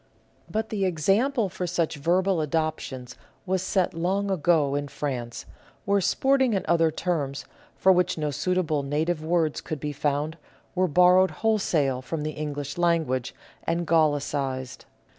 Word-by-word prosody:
But 220 +1 -2
the 205 -3 -2
example 200 - +2
for 180 -1 -4
such 170 -3 -1
verbal 180 +4 +1
adoptions 150 -5 -3 0.3
was 190 -1 0
set 190 -1 0
long 190 +4 -1
ago 160 -5 +2
in 145 0 -1
France, 125 -5 -4 0.4
where 200 0 +2
sporting 265 +3 +2
and 190 - -1
other 165 -1 +3
terms, 145 -5 -2 0.3
for 190 - +4
which 180 -1 +2
no 150 -1 -1
suitable 165 -2 0
native 155 +4 -1
words 160 -2 0
could 155 - -5
be 150 +1 -4
found, 150 +3 -1 0.3
were 185 0 +2
borrowed 180 +3 +5 0.2
wholesale 155 -12 +1
from 150 +4 -4
the 155 - -2
English 145 0 -5
language, 160 -8 +1 0.3
and 170 +1 -1
gallicised. 145 -5 0
165 Hz, 140 wpm, -26 LUFS, 145-185 Hz, 0.4 s, borrowed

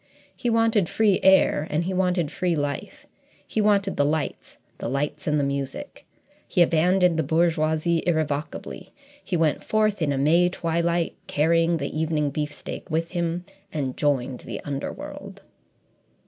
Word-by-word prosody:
He 240 - -2
wanted 225 -5 +2
free 210 -4 +3
air 190 -5 +4
and 155 +3 0
he 185 +2 -2
wanted 180 -4 +1
free 180 -3 0
life; 145 -1 -4 0.4
he 220 - 0
wanted 200 -2 +2
the 145 - +3
lights, 150 -1 -2 0.2
the - - -4
lights, 145 +3 -2
and 150 -1 +2
the - - +1
music. 140 -1 -4 0.4
He 175 - +4
abandoned 175 +1 +3
the - - +2
bourgeoisie 160 +1 +1
irrevocably. 155 -2 -2 0.3
He 180 - -1
went 160 -2 +1
forth 215 -3 +1
in 150 -3 +1
a 140 - -1
May 165 +6 +4
twilight, 170 -1 0
carrying 165 +2 +2
the 140 -1 -4
evening 155 -2 0
beefsteak 150 +1 -5
with 165 +1 -1
him, 175 0 -2 0.3
and 135 -4 -3
joined 135 -3 0
the - - -7
underworld. 140 -1 -6
165 Hz, 150 wpm, -24 LUFS, 150-180 Hz, 0.4 s, air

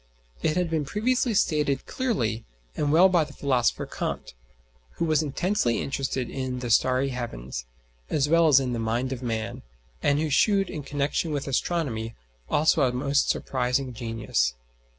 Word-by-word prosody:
It 155 - +1
had 180 -1 +1
been 160 -2 0
previously 235 - 0
stated 150 -7 +1
clearly 120 - -1 0.3
and 145 -1 0
well 170 +5 +7
by 175 -4 +3
the 150 -1 -9
philosopher 130 -4 +1
Kant, - - -4 0.6
who - - -1
was 155 -2 +3
intensely 155 - 0
interested 135 -2 -2
in 130 -1 -4
"the 125 -2 -3
starry 130 +3 +3
heavens" 65 - -5 0.4
as 145 -1 +1
well 165 +1 +5
as 140 -3 +7
in 130 -2 -2
the 120 - -2
"mind 120 +4 -1
of 130 - -7
man," 115 -1 -3 0.4
and 145 0 +2
who 155 -1 -1
shewed 195 +6 +3
in 150 - -4
connexion 145 +3 -1
with 145 -2 -2
astronomy 130 -6 -1 0.3
also 155 +1 +3
a 130 -2 +3
most 140 +3 +1
surprising 125 0 0
genius. 115 - -1
135 Hz, 160 wpm, -26 LUFS, 125-155 Hz, 0.6 s, well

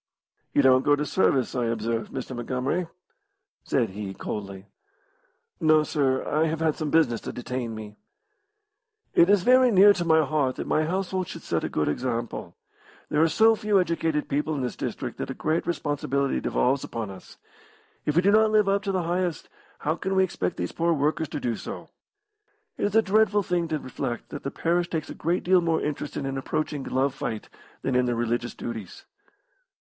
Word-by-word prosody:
"You 145 - +5
don't 130 -1 +6
go 145 +1 +4
to 150 +1 -2
service, 135 -7 +1
I 125 -2 0
observe, 115 0 -2
Mr. 130 -1 -5
Montgomery" 130 +8 -2 0.8
said - - 0
he, 100 -1 -6
coldly. 100 -2 -6 0.9
"No, 155 -1 +4
sir; 135 -4 0
I 155 +2 +2
have 160 0 -2
had 160 -1 +2
some 155 -1 -3
business 140 -8 +2
to - - -5
detain 125 -2 -4
me." 105 -1 -9 1.2
"It 170 - +5
is 200 -3 +4
very 255 +2 +6
near 205 -1 +7
to 180 - -2
my 160 -2 +4
heart 140 -3 0
that - - -5
my 155 - +1
household 185 +1 -2
should - - -8
set - - -1
a - - -2
good 75 - -1
example. 120 +7 -3 0.5
There 150 - +2
are 165 - +5
so 225 +5 +5
few 210 -2 +2
educated 165 -4 0
people 150 +2 -1
in 140 - -2
this 125 - -3
district - - -5
that - - -4
a - - -4
great 160 +2 -1
responsibility 140 -4 -1
devolves 130 +2 +1
upon 115 -4 -5
us. 95 -1 -13 0.7
If 150 - -1
we 175 - +4
do 200 - +5
not 220 +1 +5
live 215 -1 +3
up 200 0 +2
to 195 - 0
the 185 -2 0
highest, 175 -1 -2 0.3
how 155 +3 0
can 190 +2 -2
we 190 - +5
expect 90 - -2
these 90 - -3
poor 170 0 +1
workers 155 +2 0
to - - -4
do 120 -4 -1
so? - - -8 0.9
It - - -1
is 205 +1 -1
a 225 - +6
dreadful 210 0 +3
thing 175 -2 0
to 160 -1 -1
reflect 125 -3 -5
that 145 - -6
the 140 - -3
parish 170 +4 0
takes 160 -2 -3
a - - -5
great 170 +3 -1
deal 180 0 +4
more 165 -1 +1
interest 150 -1 -4
in 140 - -3
an 135 0 -2
approaching 150 +1 -2
glove 135 +1 0
fight 110 -5 -5 0.3
than 135 - 0
in 125 0 +3
their 120 - 0
religious 120 +1 -1
duties." 110 -6 -7
150 Hz, 195 wpm, -26 LUFS, 125-175 Hz, 1.2 s, near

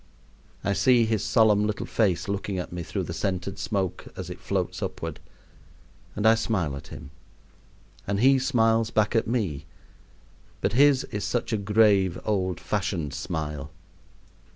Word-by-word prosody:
I 100 - +1
see 120 +2 +4
his 110 -2 0
solemn 105 -1 +4
little 105 - -3
face 95 -6 0
looking 100 -1 -2
at 90 - -4
me 90 - -4
through 80 - -3
the - - -5
scented 95 0 -3
smoke 100 -5 -2
as - - -6
it - - -8
floats - - -2
upward, - - -4 1.0
and 105 - -2
I 110 - +8
smile 100 -10 -1
at 70 - -9
him; 70 - -10 1.0
and 100 0 0
he 135 +3 +5
smiles 115 -4 +2
back 110 0 +1
at 115 - +2
me, 95 - -2 0.9
but 100 - -1
his 140 +1 +5
is 105 -2 -3
such 115 +3 -1
a - - +4
grave, 100 -3 +3
old 95 -4 0
fashioned 90 -8 -2
smile. 75 -4 -4
105 Hz, 155 wpm, -26 LUFS, 95-115 Hz, 1.0 s, I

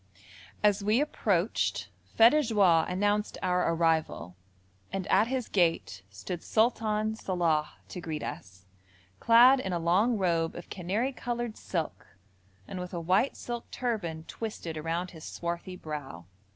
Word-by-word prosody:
As 205 -1 +3
we 215 +4 +3
approached 210 - 0 0.3
feux 230 +1 +8
de 305 - +3
joie 195 - +3
announced 205 +3 0
our 180 -2 +2
arrival, 160 - 0 0.6
and 195 -2 -3
at 210 +4 +4
his 255 -1 -2
gate 165 - 0
stood 165 - -6
Sultan 220 -1 +1
Salàh 170 -7 0 0.2
to 180 - -7
greet 155 -2 -4
us, 95 0 -8 0.5
clad 245 +4 +7
in 190 -7 -3
a - - +1
long 190 +8 +2
robe 170 -4 0
of 175 - -10
canary 205 +9 -1
coloured 240 -2 -4
silk, 165 - -5 0.5
and 185 - -6
with 180 0 -6
a - - -2
white 185 +10 +1
silk 240 -1 -6
turban 195 -11 -3
twisted 190 -5 -6
around 165 +3 -3
his 160 -3 -12
swarthy 170 +2 -5
brow. 145 - -7
185 Hz, 140 wpm, -29 LUFS, 165-220 Hz, 0.6 s, feux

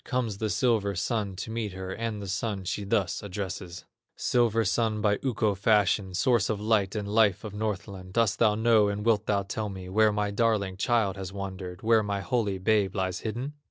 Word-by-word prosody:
Comes 120 -6 -2
the 110 - -1
silver 105 -5 +1
Sun 100 0 -1
to 100 +4 -6
meet 110 -4 -3
her, 95 0 -6
And 110 -2 -4
the - - -6
Sun 100 +1 -2
she 100 +2 -3
thus 95 -2 0
addresses: 95 -2 -6 0.3
"Silver 115 -2 +2
Sun 110 +1 +1
by 105 -1 +1
Ukko 110 -5 +1
fashioned, 100 -2 +2
Source 120 -5 +2
of 110 -2 -1
light 105 -2 +1
and 105 -1 -3
life 105 -2 +3
to 105 -2 -7
Northland, 100 -3 -4
Dost 115 -2 +2
thou 110 -3 +4
know 110 -1 +4
and 100 +1 -3
wilt 110 -2 +2
thou 100 -1 +1
tell 105 +2 -4
me 95 -2 -8
Where 110 +2 +4
my 105 0 -1
darling 105 -3 +1
child 105 -2 +1
has 95 -1 -6
wandered, 95 -1 -6
Where 115 0 +4
my 100 -1 -2
holy 105 -5 0
babe 100 0 +1
lies 95 -2 -1
hidden?" 120 +6 -4
105 Hz, 195 wpm, -28 LUFS, 95-110 Hz, 0.3 s, thou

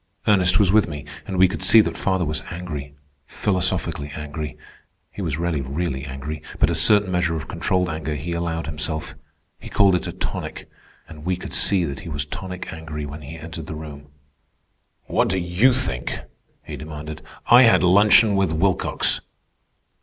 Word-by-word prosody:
Ernest 95 -4 +4
was 100 -4 +4
with 110 +1 +4
me, 75 -3 -7 0.2
and 95 -3 -3
we 95 +1 +6
could 95 - -5
see 115 - +7
that 110 - +2
father 95 -2 0
was 75 0 -2
angry—philosophically 75 +1 -3
angry. 75 0 -6 0.5
He - - -7
was 80 -6 -2
rarely 85 -3 -1
really 70 0 -3
angry; 70 +3 -6 0.2
but - - +3
a - - 0
certain 105 -3 +4
measure 85 -2 +1
of 80 - -5
controlled 90 -1 0
anger 80 -2 -3
he 75 +5 -5
allowed 85 -1 -2
himself. 75 -2 -3 0.5
He - - -10
called 100 -2 +4
it 90 - 0
a - - -3
tonic. - - -5 0.4
And 75 -1 -12
we 90 +2 0
could 90 - -8
see 95 -4 +4
that 70 -3 -5
he - - -8
was 75 -2 -2
tonic 90 +5 -7
angry 80 -2 -6
when 75 +2 -8
he 75 +3 -9
entered 80 0 -8
the 80 - -5
room. 75 -2 -9 1.0
"What - - +1
do 95 - 0
you 90 +8 +3
think?" 70 - -2 0.5
he 75 - -7
demanded. 75 +1 -8 0.2
"I 120 +1 +8
had 115 -6 +5
luncheon 100 +3 +6
with 95 -4 +1
Wilcox." 90 +2 +1
80 Hz, 175 wpm, -22 LUFS, 75-95 Hz, 1.0 s, I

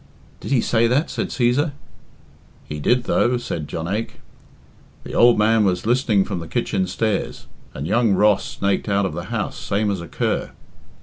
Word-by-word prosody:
"Did - - -7
he 130 -4 +3
say 115 0 +2
that?" 135 +7 +1
said - - -2
Cæsar. 135 +5 +1 0.9
"He 75 - -5
did, 120 - +2
though," 125 0 +2
said 80 -10 -5
Jonaique. 95 +9 -4 0.8
"The - - -9
ould 120 -1 +6
man 110 +1 +3
was 90 -2 0
listening 115 -5 +2
from 95 -3 -4
the 85 - -7
kitchen 95 +4 -1
stairs, 100 -10 -2 0.3
and 70 - -4
young 115 +2 +2
Ross 105 +1 +3
snaked 100 +2 -2
out 100 0 +2
of 95 - -3
the - - -5
house - - -3
same 100 +1 0
as 95 -3 -3
a 85 - -8
cur." - - -2
105 Hz, 175 wpm, -21 LUFS, 95-120 Hz, 0.9 s, ould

